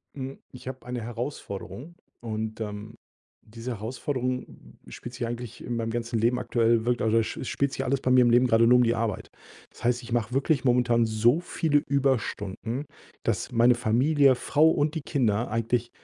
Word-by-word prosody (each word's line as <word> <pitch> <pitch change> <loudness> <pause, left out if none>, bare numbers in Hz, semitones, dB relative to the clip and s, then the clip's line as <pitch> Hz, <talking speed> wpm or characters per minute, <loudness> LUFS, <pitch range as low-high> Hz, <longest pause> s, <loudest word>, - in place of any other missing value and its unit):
Mm, 135 0 -5 0.2
ich 125 - -12
habe 130 0 -7
eine 125 -1 -4
Herausforderung. 120 - -6 0.3
Und 110 -1 -4
ähm, 105 +1 -6 0.5
diese 115 +3 -7
Herausforderung 125 +3 -4
spielt 120 - -9
sich 120 - -3
eigentlich 120 -1 -6
in 120 - -3
meinem 115 -1 -2
ganzen 115 0 -2
Leben 120 +3 +2
aktuell, 115 -2 +1
wirk 120 -1 +1
also, 115 +1 +3
sch 110 - -5
spielt 140 +2 -1
sich - - -2
alles 135 +1 0
bei 130 - +1
mir 130 0 +6
im 120 - +4
Leben 120 +2 +5
grade 115 -1 +4
nur 125 +1 +6
die 115 -1 +2
Arbeit. 110 -4 -2 0.4
Das - - -16
heißt, 120 0 +1
ich 120 - -10
mache 120 -1 -1
wirklich 135 0 +1
momentan 120 -2 +3
so 115 +6 +3
viele 155 -4 +1
Überstunden, 130 -2 -1 0.4
dass - - -1
meine 120 +1 +5
Familie, 130 +5 +3
Frau 150 +5 +3
und 150 0 +1
die 160 - -2
Kinder 120 -6 0
eigentlich, 115 +1 0
120 Hz, 180 wpm, -26 LUFS, 115-130 Hz, 0.5 s, mir